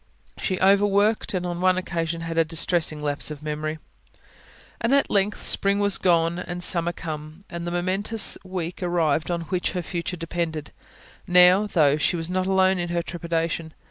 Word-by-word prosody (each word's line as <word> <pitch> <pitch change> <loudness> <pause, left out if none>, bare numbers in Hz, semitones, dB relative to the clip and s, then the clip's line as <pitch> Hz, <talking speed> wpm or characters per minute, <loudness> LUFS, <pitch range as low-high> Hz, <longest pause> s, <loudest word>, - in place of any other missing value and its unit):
She 185 -2 -2
overworked; 200 +2 +3
and 180 -1 -2
on 175 0 -4
one 185 0 +3
occasion 165 -2 -3
had 165 0 -4
a 165 - +4
distressing 160 -1 0
lapse 145 0 -1
of 150 -1 -8
memory. 155 +1 -3 1.0
And 235 +4 +2
at 280 - +1
length 205 0 0
spring 200 0 +3
was 200 -1 +2
gone 170 -1 +2
and 175 0 -5
summer 175 -1 +2
come, 155 +2 -8
and 170 0 -5
the - - -2
momentous 195 +5 0
week 180 -2 -5
arrived 165 -3 0
on 170 -1 -1
which 180 +2 -2
her 180 -2 -3
future 175 +1 -4
depended. 165 -2 -4 0.6
Now, 180 +3 +6
though, 150 -7 +3
she 155 - +1
was 165 +1 -4
not 185 0 0
alone 190 -1 +3
in 175 0 -2
her 170 0 -1
trepidation. 165 -2 -3
175 Hz, 175 wpm, -24 LUFS, 165-185 Hz, 1.0 s, Now